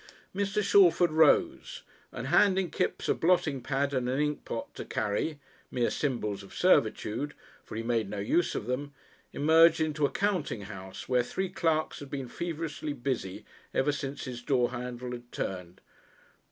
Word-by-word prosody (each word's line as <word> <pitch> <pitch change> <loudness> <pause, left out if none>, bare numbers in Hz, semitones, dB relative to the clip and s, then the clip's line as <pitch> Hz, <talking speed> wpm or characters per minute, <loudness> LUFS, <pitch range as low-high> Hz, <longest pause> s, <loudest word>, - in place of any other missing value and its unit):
Mr. 200 +1 0
Shalford 175 -4 +5
rose, 330 - +3 0.3
and - - -6
handing 190 -3 +4
Kipps - - -1
a - - +4
blotting 160 -6 +2
pad 140 +2 -1
and 125 -2 0
an 130 - 0
inkpot 150 0 -3
to - - -6
carry 110 +9 -1 0.3
mere 120 -2 0
symbols 105 -8 -2
of 100 - -13
servitude, 140 +8 +2 0.3
for - - -9
he 115 - -3
made 115 -3 0
no 105 - -5
use 115 +12 +1
of - - -3
them 135 +3 -3 0.4
emerged 160 +3 +5
into 155 -1 -1
a - - -10
counting 190 - -1
house 95 -2 -8
where 125 -1 +3
three 185 +10 -3
clerks 165 -4 0
had 145 - -9
been 135 -2 -4
feverishly 155 0 -4
busy 120 -8 -3 0.3
ever 145 - +3
since 140 -1 -4
his 125 -2 -6
door 125 -1 +1
handle 125 0 -5
had 120 0 -8
turned. 90 -1 -5
140 Hz, 160 wpm, -29 LUFS, 120-160 Hz, 0.4 s, Shalford